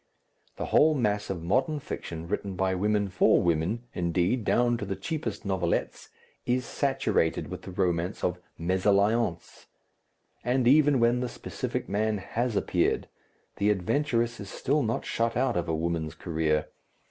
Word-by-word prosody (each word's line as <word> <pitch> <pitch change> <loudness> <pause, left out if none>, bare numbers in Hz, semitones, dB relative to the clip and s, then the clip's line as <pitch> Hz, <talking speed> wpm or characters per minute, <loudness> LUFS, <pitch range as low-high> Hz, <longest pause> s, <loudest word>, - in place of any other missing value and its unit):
The - - -4
whole 155 +1 +6
mass 105 -5 0
of 90 -4 -4
modern 130 - +1
fiction 85 - -6
written 100 0 -3
by 95 +1 +1
women 105 +2 +1
for 100 +3 +4
women, 85 +6 0
indeed, 90 +7 0
down 120 +3 +2
to 105 - -4
the 95 0 -3
cheapest 160 - -4
novelettes, 95 -3 -1 0.3
is 125 0 0
saturated 135 - 0
with - - -6
the - - -9
romance 90 -1 -1
of 90 0 0 0.2
mésalliance. 100 +2 +1 0.8
And 125 0 +1
even 145 0 +5
when 120 +1 +3
the 125 -1 -2
specific - - -4
man 105 +1 0
has 115 +4 -2
appeared, - - +1 0.5
the 100 - +2
adventurous 115 +4 0
is 100 - -7
still 145 +3 0
not 115 -3 -1
shut 115 0 0
out 125 -2 +1
of 85 -1 -1
a 80 - +1
woman's 80 -1 -2
career. 80 -3 -1
105 Hz, 150 wpm, -28 LUFS, 90-120 Hz, 0.8 s, whole